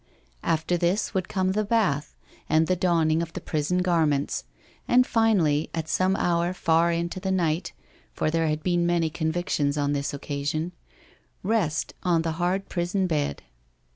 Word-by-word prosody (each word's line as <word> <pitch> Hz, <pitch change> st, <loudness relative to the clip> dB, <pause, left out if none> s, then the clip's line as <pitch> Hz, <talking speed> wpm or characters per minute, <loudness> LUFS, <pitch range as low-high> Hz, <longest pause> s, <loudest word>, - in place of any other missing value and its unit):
After 165 Hz, +2 st, 0 dB
this 175 Hz, +4 st, 0 dB
would 185 Hz, -2 st, -1 dB
come 185 Hz, -2 st, 0 dB
the 210 Hz, +2 st, 0 dB
bath 200 Hz, -10 st, 0 dB, 0.3 s
and 155 Hz, +1 st, +4 dB
the 185 Hz, -, +1 dB
donning 165 Hz, -3 st, +2 dB
of 165 Hz, -1 st, -5 dB
the -, -, -4 dB
prison 165 Hz, +4 st, -1 dB
garments, 155 Hz, -5 st, +1 dB, 0.4 s
and 250 Hz, +1 st, +5 dB
finally, 190 Hz, -12 st, +2 dB
at 160 Hz, -1 st, -3 dB
some 185 Hz, +4 st, +2 dB
hour 175 Hz, 0 st, 0 dB
far 170 Hz, -1 st, +3 dB
into 170 Hz, +2 st, -2 dB
the 190 Hz, +1 st, -3 dB
night—for 155 Hz, -, -2 dB
there 165 Hz, 0 st, +1 dB
had 155 Hz, 0 st, -1 dB
been 175 Hz, -1 st, +1 dB
many 170 Hz, -2 st, +1 dB
convictions 160 Hz, -3 st, -1 dB
on 145 Hz, 0 st, +1 dB
this 140 Hz, 0 st, -1 dB
occasion— 145 Hz, +3 st, -3 dB, 0.7 s
rest 185 Hz, -8 st, 0 dB
on 170 Hz, -3 st, +2 dB
the 165 Hz, -, -1 dB
hard 185 Hz, +3 st, 0 dB
prison 180 Hz, +2 st, -1 dB
bed. 150 Hz, -, -1 dB
170 Hz, 155 wpm, -26 LUFS, 155-185 Hz, 0.7 s, and